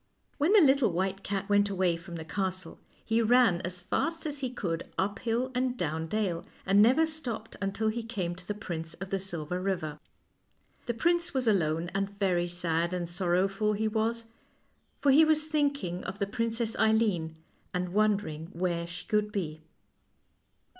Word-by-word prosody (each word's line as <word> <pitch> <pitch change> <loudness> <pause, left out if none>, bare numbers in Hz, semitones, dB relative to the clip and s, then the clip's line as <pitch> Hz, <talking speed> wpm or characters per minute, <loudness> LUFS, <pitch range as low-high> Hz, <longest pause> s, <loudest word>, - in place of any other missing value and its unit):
When 300 +6 +3
the 425 - +8
little 270 - +5
white 190 +3 -1
cat 195 -1 -3
went 205 0 +3
away 185 -3 +1
from 170 +1 -9
the 160 -1 -6
castle 185 +1 -3 0.3
he 225 +1 +2
ran 230 -6 +4
as 180 +1 -2
fast 325 - -2
as 295 -2 -2
he 260 -2 -2
could 175 -9 -3
up 200 +3 0
hill 240 +2 -1
and 250 0 0
down 160 -3 -2
dale, 185 -3 -1 0.2
and 195 +1 +5
never 260 +9 +5
stopped 250 -9 -6
until 205 +3 0
he 235 +2 -2
came 205 -7 -3
to 180 0 -15
the 210 - -2
Prince 165 -5 -5
of 195 +1 -8
the 195 - +1
Silver 180 -2 -3
River. 165 -6 -2 0.9
The 235 - -1
prince 340 +4 +1
was 255 -2 +1
alone, 170 -4 +1
and 195 +1 -2
very 180 -3 +1
sad 175 0 -1
and 175 -1 -2
sorrowful 190 +4 +1
he 215 +1 0
was, 225 +1 -1 0.7
for 280 - +3
he 300 +4 +7
was 310 -1 +3
thinking 280 - -1
of 190 +1 -5
the 200 - 0
Princess 230 +2 -2
Eileen, 215 -8 +2 0.4
and 180 0 -2
wonder 210 0 +2
ins: 160 +4 -8
where 170 -1 -1
she 175 +1 -8
could 210 -1 +1
be. 160 -6 -3
200 Hz, 175 wpm, -29 LUFS, 175-230 Hz, 0.9 s, the